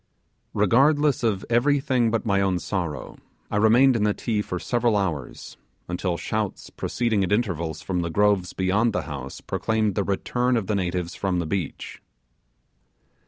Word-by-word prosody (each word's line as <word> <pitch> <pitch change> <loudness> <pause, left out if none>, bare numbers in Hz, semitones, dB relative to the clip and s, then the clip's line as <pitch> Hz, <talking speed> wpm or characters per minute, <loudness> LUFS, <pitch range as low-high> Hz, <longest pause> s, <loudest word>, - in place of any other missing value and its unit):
Regardless 140 +7 +3
of 105 -5 0
everything 130 0 +2
but 115 +1 -1
my 100 -2 +2
own 95 -2 +1
sorrow, 85 -7 -4 0.3
I - - 0
remained 120 +5 +5
in 110 - +1
the 105 -1 +2
Ti 110 -3 -1
for 90 - -4
several 120 +2 +1
hours, 85 -10 -4 0.3
until 90 0 -2
shouts - - -3
proceeding 115 -4 0
at 90 - -2
intervals 85 -8 -1
from 90 -2 -2
the 85 - -2
groves 100 -1 +2
beyond 100 +5 +1
the - - -1
house 70 -4 -7
proclaimed 110 -2 0
the 100 - 0
return 120 +6 0
of 110 - -1
the 105 - -1
natives 90 -3 -2
from 95 -2 -1
the 85 - -1
beach. 90 -1 -4
105 Hz, 160 wpm, -24 LUFS, 90-115 Hz, 0.3 s, remained